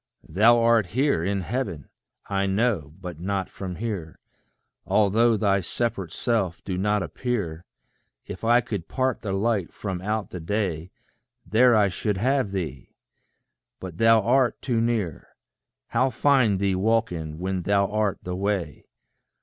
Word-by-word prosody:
Thou 110 +8 +5
art 115 -4 +3
here 125 - +1
in 100 +1 -1
heaven, 90 - -4 0.4
I 100 -1 -1
know, 95 - 0
but 90 -4 -8
not 95 +1 -2
from 95 -2 -6
here 95 -6 -5 0.7
Although 110 +2 +3
thy 100 -2 +2
separate 100 -2 -3
self 100 -7 -1
do 95 - -3
not 105 +2 +1
appear; 90 -6 -3 0.6
If 95 - -8
I 120 +2 +4
could 85 -6 -5
part 130 -2 -1
the 100 - -4
light 100 -2 0
from 95 -4 -5
out 105 +2 -2
the 90 - -6
day, 85 -2 -2 0.6
There 120 +2 +4
I 105 -2 +4
should 100 +3 -2
have 130 +2 +1
thee! 80 -9 -5 0.8
But 90 -3 -8
thou 115 0 +5
art 125 0 +2
too 120 -4 0
near: 110 -9 -2 0.5
How 130 - +2
find 130 -7 +3
thee 100 0 +1
walking, 95 -6 0
when 95 +1 -2
thou 100 +2 +2
art 105 -1 0
the 90 0 -4
way? 95 -5 -2
100 Hz, 145 wpm, -25 LUFS, 90-115 Hz, 0.8 s, Thou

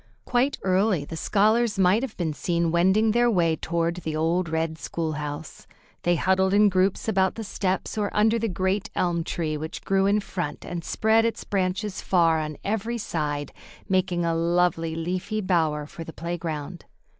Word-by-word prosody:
Quite 255 +3 +1
early 185 -4 +2
the 165 - -7
scholars 215 +6 +2
might 190 +3 +4
have 265 -4 -5
been 165 -4 -1
seen 170 +1 0
wending 190 +6 +3
their 240 +2 +3
way 170 -6 +2
toward 170 +1 -1
the 160 -3 -4
old 165 +2 0
red 160 0 -2
school 165 -2 -3
house. 150 +1 -6 0.3
They 175 0 +2
huddled 190 +3 +2
in 210 0 +6
groups 185 +2 +1
about 190 -3 +2
the 225 - -5
steps 195 +1 -2
or 205 -1 0
under 220 +2 +3
the 225 0 -1
great 190 +3 -1
elm 175 -2 0
tree 155 -2 -2
which 155 +1 -6
grew 195 0 +2
in 205 +1 +3
front 175 -7 -5
and 175 -1 -5
spread 220 +4 +2
its 230 0 -1
branches 195 +1 -2
far 165 -3 +3
on 155 -1 -4
every 220 +3 -2
side, 145 - -3 0.4
making 185 -3 +1
a 165 - +1
lovely 165 -1 +1
leafy 180 +6 -2
bower 160 -6 +1
for 165 +2 -9
the 160 - -9
playground. 170 -1 -5
180 Hz, 175 wpm, -25 LUFS, 165-200 Hz, 0.4 s, in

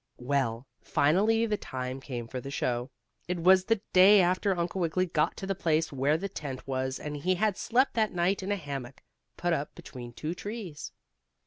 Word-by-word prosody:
Well, 125 -2 -1 0.2
finally 210 +10 +3
the 210 -2 0
time 130 -3 -5
came 120 -4 -6
for 125 +2 -5
the 135 - -7
show. 125 -2 -1 0.4
It 180 0 -1
was 185 +2 +5
the 225 -1 +1
day 195 +3 +8
after 185 +1 +2
Uncle 175 +2 -2
Wiggily 175 +2 +1
got 175 - 0
to - - -5
the 195 - 0
place 160 -4 0
where 140 +3 +2
the 195 +4 -3
tent 145 -8 -6
was, 130 0 -2
and 150 0 -5
he 185 +6 +1
had 210 +1 +1
slept 255 +7 +2
that 220 -2 +1
night 180 +3 +1
in 190 +2 -3
a - - +2
hammock, 140 -7 -7 0.3
put 175 -1 0
up 145 -2 -3
between 120 -2 -9
two 155 +7 -4
trees. 195 -5 -6
165 Hz, 195 wpm, -29 LUFS, 135-190 Hz, 0.4 s, day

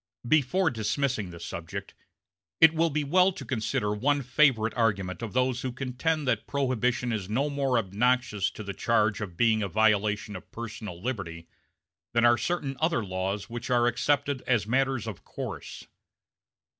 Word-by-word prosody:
Before 155 +5 +3
dismissing 115 -1 -1
this 85 -1 -8
subject 85 -1 -6 0.7
it 160 0 +8
will 165 +1 +2
be 150 0 -1
well 180 +6 +4
to 135 - -8
consider 110 -3 -1
one 140 +6 +1
favorite 130 -4 +3
argument 100 -6 0
of 115 -3 -5
those 125 0 +1
who 130 - -3
contend 135 +4 -2
that - - 0
Prohibition 125 -3 0
is 100 -3 -3
no 135 +7 0
more 135 -3 +1
obnoxious 110 0 +1
to 110 - -7
the 100 -1 -5
charge 110 0 +1
of 90 -5 -6
being 110 0 +3
a 100 - 0
violation 105 0 +1
of 90 - -10
personal 105 -5 -7
liberty 90 -8 -5 0.7
than 120 0 +4
are 120 0 +6
certain 140 -2 -2
other 160 -9 +1
laws 95 +2 -3
which 120 +2 -6
are 120 -1 +3
accepted 140 +3 +1
as 115 -5 +2
matters 130 0 +1
of 110 -5 -7
course. - - -7
120 Hz, 160 wpm, -28 LUFS, 105-135 Hz, 0.7 s, it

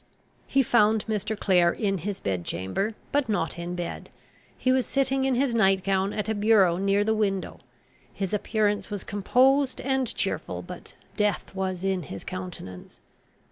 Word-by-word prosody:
He 270 0 +3
found 220 -3 +3
Mr. 215 0 -2
Clare 180 -3 +4
in 195 -2 -1
his 195 +3 -4
bed 95 -3 -2
chamber, 195 - -2 0.2
but 285 -4 +1
not 175 -5 -1
in 175 +1 -4
bed. 175 -1 -5 0.5
He 255 - +1
was 260 -1 +2
sitting 270 -1 +1
in 265 -1 +2
his 255 -1 +1
night 195 -4 +3
gown 195 0 +1
at 210 0 -3
a 220 - +1
bureau 205 -5 +4
near 195 +2 +2
the 220 +1 +1
window. 200 -3 -1 0.5
His 195 0 -4
appearance 210 0 0
was 205 -3 -4
composed 260 +7 +2
and 265 -1 0
cheerful, - - -2
but - - -10 0.2
death 210 -2 0
was 190 -1 -3
in 190 -1 0
his 100 - -8
countenance. 180 - -8
205 Hz, 165 wpm, -26 LUFS, 185-225 Hz, 0.5 s, Clare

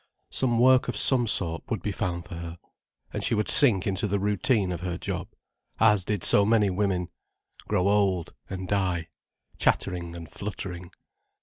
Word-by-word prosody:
Some 120 -3 -1
work 130 +2 +3
of - - -4
some 125 -3 +7
sort 85 -6 +2
would - - -5
be - - -3
found 85 -1 -5
for - - -12
her. 85 0 -9 0.6
And - - -5
she - - 0
would 105 0 -2
sink 110 -10 +7
into 100 +1 -2
the 100 +1 -2
routine 100 0 -1
of 85 -2 -6
her 90 -1 -5
job, - - -6 0.5
as 105 -4 +2
did 105 -3 -4
so 100 - +5
many 105 -2 +1
women, 95 -1 -2
and 90 - -10 0.6
grow 90 +1 -1
old 100 -4 -1 0.2
and 95 0 -7
die, 90 -4 -3 0.5
chattering 85 -3 -2
and 85 -1 -10
fluttering. 90 -3 -8
95 Hz, 175 wpm, -24 LUFS, 90-105 Hz, 0.6 s, some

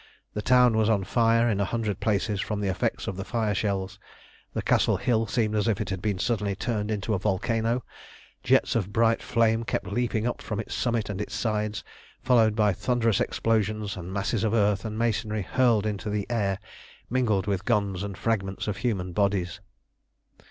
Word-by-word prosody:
The 105 - -2
town 125 +1 +5
was 110 0 +3
on 105 -3 +2
fire 115 +3 +3
in 105 -4 +1
a 100 - +2
hundred 110 -2 -2
places 105 -1 0
from 105 -2 -3
the 100 -1 -1
effects 95 - -1
of 95 - -3
the 95 - -3
fire 110 -1 -1
shells. 100 -1 -2 0.6
The - - -1
Castle - - +3
hill 115 -2 +1
seemed 110 -1 0
as 105 +1 +1
if 110 -4 +1
it - - -3
had 95 -2 -3
been 105 -2 -1
suddenly 105 -1 -1
turned 105 0 -2
into 110 0 -1
a 95 - 0
volcano; 115 +5 0 0.6
jets - - +3
of 105 -4 -1
bright 115 +1 +2
flame 115 -1 +2
kept - - -2
leaping 120 -2 -1
up 120 - -2
from 105 - -4
its 110 - -5
summit 115 -3 0
and 100 +1 -3
sides, 105 -2 -2 0.4
followed 115 -4 +4
by 105 -2 +3
thunderous 115 0 +1
explosions 110 -2 0
and 90 -1 -7
masses 100 +2 -1
of 110 0 +1
earth 105 -2 +2
and 110 0 -4
masonry 110 -2 0
hurled 120 -1 +2
into 105 -1 -3
the 105 -1 -1
air, 100 -5 0 0.5
mingled 110 -6 +1
with 95 -2 -1
guns 100 -5 +1
and 100 -2 -5
fragments 100 -4 -1
of 105 -2 -2
human 100 -6 -2
bodies. 100 -1 0
105 Hz, 185 wpm, -26 LUFS, 100-115 Hz, 0.6 s, town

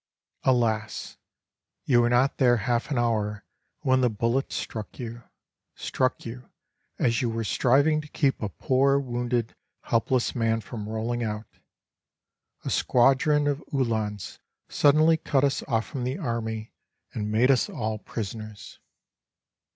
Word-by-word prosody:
"Alas! 110 -4 0 0.7
you 120 -3 +4
were 120 - +2
not 125 +3 +2
there 120 -3 +5
half 120 +4 -1
an 140 - -1
hour 105 -3 0 0.4
when 130 0 +3
the 125 - +3
bullet 115 +5 -1
struck 110 -2 -5
you 120 -1 -6 0.5
struck 130 0 -1
you 120 +2 -8 0.5
as 115 -1 +1
you 120 - 0
were 115 0 -2
striving 140 +8 +3
to 155 - -12
keep 140 -2 0
a 105 - -2
poor, 135 +6 +2
wounded, 120 -3 -2 0.3
helpless 120 +2 +1
man 115 -1 +1
from 110 -2 -7
rolling 115 +2 -2
out. 105 0 -3 1.2
A - - -2
squadron 135 +4 +3
of 145 0 -1
Uhlans 110 -7 -2 0.3
suddenly 155 +3 +4
cut 145 -4 +1
us 140 -1 +1
off 115 -4 +1
from 135 -4 -5
the 130 +4 -2
army 115 - -3 0.4
and 105 -1 -3
made 120 +5 +4
us 130 - +2
all 110 -1 -3
prisoners. 110 -1 -7
120 Hz, 135 wpm, -26 LUFS, 110-135 Hz, 1.2 s, there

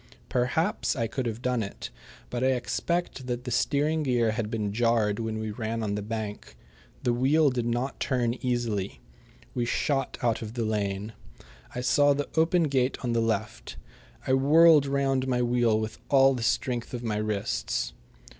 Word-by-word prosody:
Perhaps 160 - 0
I 115 -4 0
could 125 +2 -3
have 115 +1 -5
done 125 -2 +1
it, 100 -1 -6 0.4
but 125 0 -2
I 130 0 +4
expect 155 +1 -2
that 120 0 -3
the 125 - -5
steering 150 +6 +1
gear 120 -5 +2
had 110 -1 -2
been 105 -3 -2
jarred 115 -2 +2
when 110 -1 -3
we 110 0 -3
ran 110 +1 -3
on 105 -1 -1
the 105 - -2
bank. 105 -1 -5 0.5
The 120 - +2
wheel 140 +4 +3
did 120 -2 -2
not 120 +3 -2
turn 120 -3 0
easily. 115 -6 -1 0.5
We 120 - -1
shot 135 +3 -1
out 115 -2 +1
of 110 +1 -7
the 115 -2 -1
lane. 105 0 -2 0.6
I 125 - -2
saw 145 +3 +4
the 145 0 -3
open 165 +2 +3
gate 135 -3 +1
on 120 -2 0
the 115 - +2
left. 110 - -2 0.5
I 130 - +1
whirled 150 +2 +6
round 135 -1 +1
my 125 -1 +1
wheel 120 -2 +2
with 110 0 -5
all 135 -1 +6
the 125 - -4
strength 120 +1 -1
of 120 - -6
my 110 -3 -1
wrists. 100 - -2
120 Hz, 175 wpm, -27 LUFS, 110-135 Hz, 0.6 s, whirled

